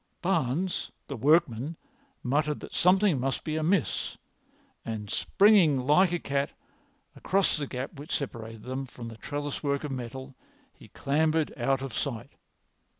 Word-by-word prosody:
Barnes, 175 Hz, 0 st, 0 dB, 0.2 s
the 140 Hz, -, -4 dB
workman, 140 Hz, +1 st, +2 dB, 0.5 s
muttered 150 Hz, +3 st, +1 dB
that -, -, -9 dB
something 185 Hz, -4 st, +4 dB
must 135 Hz, +2 st, -1 dB
be 155 Hz, -1 st, -2 dB
amiss, 160 Hz, +1 st, 0 dB, 0.7 s
and 105 Hz, -2 st, -5 dB
springing 195 Hz, -9 st, +5 dB
like 175 Hz, +6 st, +5 dB
a 175 Hz, -, +1 dB
cat 140 Hz, -3 st, -1 dB, 0.6 s
across 195 Hz, +1 st, +2 dB
the 145 Hz, -2 st, -3 dB
gap 130 Hz, +5 st, -5 dB
which 145 Hz, -, -3 dB
separated 115 Hz, -5 st, -5 dB
them 130 Hz, +1 st, -4 dB
from 120 Hz, -1 st, -8 dB
the 115 Hz, -, -10 dB
trellis 145 Hz, +2 st, -4 dB
work 140 Hz, -1 st, 0 dB
of 150 Hz, -, -4 dB
metal 130 Hz, +1 st, -6 dB, 0.4 s
he -, -, -16 dB
clambered 155 Hz, +2 st, +1 dB
out 135 Hz, +2 st, 0 dB
of 135 Hz, -4 st, -5 dB
sight. 120 Hz, -3 st, -3 dB
140 Hz, 145 wpm, -28 LUFS, 130-160 Hz, 0.7 s, springing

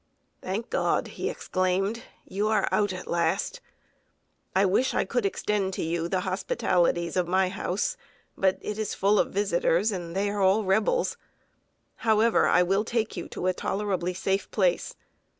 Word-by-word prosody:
"Thank 205 Hz, +6 st, -4 dB
God!" -, -, +1 dB
he -, -, -3 dB
exclaimed, 190 Hz, +5 st, -1 dB, 0.2 s
"you 205 Hz, +3 st, -1 dB
are 220 Hz, 0 st, +2 dB
out 205 Hz, -2 st, +2 dB
at 185 Hz, -1 st, -6 dB
last. 175 Hz, -, 0 dB, 0.9 s
I 195 Hz, +1 st, +4 dB
wish 205 Hz, +8 st, +2 dB
I -, -, +2 dB
could 240 Hz, -4 st, 0 dB
extend 195 Hz, -1 st, -1 dB
to -, -, -2 dB
you 165 Hz, +1 st, -1 dB
the 185 Hz, +1 st, 0 dB
hospitalities 180 Hz, -2 st, 0 dB
of 180 Hz, -2 st, +1 dB
my 185 Hz, +1 st, +2 dB
house; -, -, -2 dB, 0.4 s
but 190 Hz, -1 st, +2 dB
it 210 Hz, 0 st, -4 dB
is 215 Hz, -, -2 dB
full 200 Hz, +2 st, +3 dB
of -, -, +2 dB
visitors, 195 Hz, 0 st, +1 dB
and 175 Hz, -3 st, -5 dB
they 200 Hz, +1 st, 0 dB
are 205 Hz, -1 st, -2 dB
all 195 Hz, +3 st, +4 dB
Rebels. 215 Hz, -, +1 dB, 0.8 s
However, 220 Hz, 0 st, +3 dB
I 180 Hz, -, +5 dB
will 195 Hz, +3 st, +1 dB
take 225 Hz, -1 st, -1 dB
you 175 Hz, -, -5 dB
to -, -, -5 dB
a 185 Hz, -, +2 dB
tolerably 185 Hz, -2 st, -2 dB
safe 195 Hz, +2 st, -1 dB
place. -, -, 0 dB
195 Hz, 165 wpm, -27 LUFS, 185-210 Hz, 0.9 s, I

